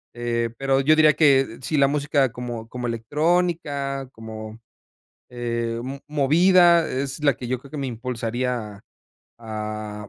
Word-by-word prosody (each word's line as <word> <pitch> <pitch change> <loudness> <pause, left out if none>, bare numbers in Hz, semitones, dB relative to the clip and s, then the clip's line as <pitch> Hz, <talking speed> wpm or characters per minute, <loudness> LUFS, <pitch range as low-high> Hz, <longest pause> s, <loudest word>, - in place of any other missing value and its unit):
eh, 120 -1 -1
pero, 135 0 +1
yo 155 +3 +4
diría 155 -1 +6
que, 135 -6 +3
si 155 - -2
la 140 -1 +5
música 145 -2 +1
como 120 -2 -6
como 125 0 -4
electrónica, 145 +2 -1
como 110 -1 -9 0.7
eh, 115 -1 -3
mo 135 +2 -6
movida, 170 +4 +4
es 135 +2 -4
la 140 -2 +4
que 125 - -7
yo 130 +1 -1
creo 135 +2 -16
que 155 - -6
me 135 -2 -3
impulsaría 120 -2 -4 0.6
a 110 -1 -6
130 Hz, 145 wpm, -23 LUFS, 115-145 Hz, 0.7 s, diría